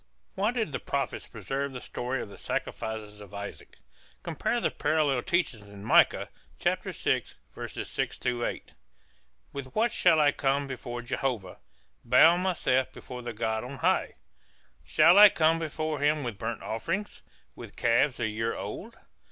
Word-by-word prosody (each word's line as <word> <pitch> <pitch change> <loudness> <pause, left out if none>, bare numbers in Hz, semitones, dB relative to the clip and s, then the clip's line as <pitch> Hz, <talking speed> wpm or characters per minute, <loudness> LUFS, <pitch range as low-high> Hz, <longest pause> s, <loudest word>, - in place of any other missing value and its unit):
Why 200 +3 +1
did 230 -8 -1
the - - -3
prophets 140 -2 -3
preserve 135 +6 -4
the 125 - -5
story 125 +1 -3
of - - -10
the 100 - -12
sacrifices 105 -2 -4
of 100 0 -11
Isaac? 100 0 -8 0.5
Compare - - -1
the - - 0
parallel 150 -5 +1
teaching 170 -10 0
in 100 0 -11
Micah - - +4 0.3
6:6 120 - -2
8. - - -7 0.8
With 135 -2 -7
what 230 +2 +2
shall 160 - +4
I 145 -1 +5
come 140 0 0
before 120 -2 -6
Jehovah, 120 -6 -3 0.4
Bow 165 +2 +7
myself 170 -8 +1
before 125 -1 -9
the 120 0 -5
God 110 0 -1
on 130 +3 -7
high? - - +1 0.7
Shall 185 - +6
I 210 0 +11
come 165 -2 +3
before 155 -1 -3
him 150 +1 +2
with 115 -5 -5
burnt 115 0 -4
offerings, 170 - -3 0.3
With - - -11
calves 120 +3 +2
a 120 - +1
year 110 +1 -2
old? - - -7
130 Hz, 145 wpm, -28 LUFS, 115-155 Hz, 0.8 s, I